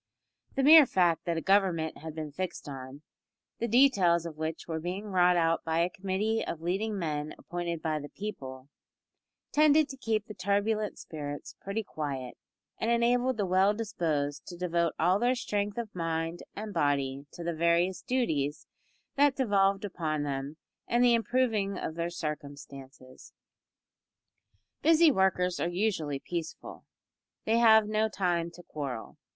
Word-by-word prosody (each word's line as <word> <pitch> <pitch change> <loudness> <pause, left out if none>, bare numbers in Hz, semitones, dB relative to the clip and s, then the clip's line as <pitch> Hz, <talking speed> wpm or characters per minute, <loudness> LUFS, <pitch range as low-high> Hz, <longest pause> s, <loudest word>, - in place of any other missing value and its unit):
The 270 - +1
mere 305 0 +9
fact 175 -5 +2
that 170 -2 -1
a - - -1
government 185 -4 +1
had 160 0 -8
been 155 -2 -5
fixed 180 +1 -5
on, 135 +1 -8 0.6
the 235 - -1
details 200 -9 +4
of 165 -2 -6
which 160 +1 -4
were 160 -1 -3
being 180 +5 -4
wrought 180 -3 +3
out 165 -1 +1
by 165 0 0
a 175 +2 +1
committee 200 +4 -1
of 165 - -5
leading 195 +6 -2
men 155 -4 -3
appointed 170 -2 -5
by 155 -1 0
the 145 0 -8
people, 135 -11 -7 0.8
tended 305 0 +5
to 270 - -8
keep 220 -4 -1
the 210 - -9
turbulent 205 +2 0
spirits 145 -2 -7
pretty 200 +3 -3
quiet, 140 -8 -5 0.4
and 225 - -1
enabled 245 +1 +2
the 205 - 0
well 190 +3 +3
disposed 155 -10 -2
to 175 - -8
devote 170 -2 0
all 180 +4 +3
their 245 +2 +2
strength 205 -4 -2
of 230 -3 -4
mind 165 0 -2
and 210 0 -6
body 140 -2 0
to 175 - -8
the 170 0 -2
various 170 +3 +1
duties 155 - -1 0.5
that 285 -1 +4
devolved 200 -5 +2
upon 155 -6 -2
them 140 +1 -4 0.3
and 240 +1 +2
the 245 -1 +5
improving 225 -4 +1
of - - -4
their 170 +1 -2
circumstances. 140 -5 -8 1.5
Busy 325 0 +6
workers 185 -4 +1
are 170 - 0
usually 175 -6 -1
peaceful. 165 +3 -7 0.6
They 225 +1 +3
have 220 -2 +6
no 215 +1 +1
time 175 -4 0
to 175 - -13
quarrel. 140 -8 -6
180 Hz, 155 wpm, -29 LUFS, 155-215 Hz, 1.5 s, mere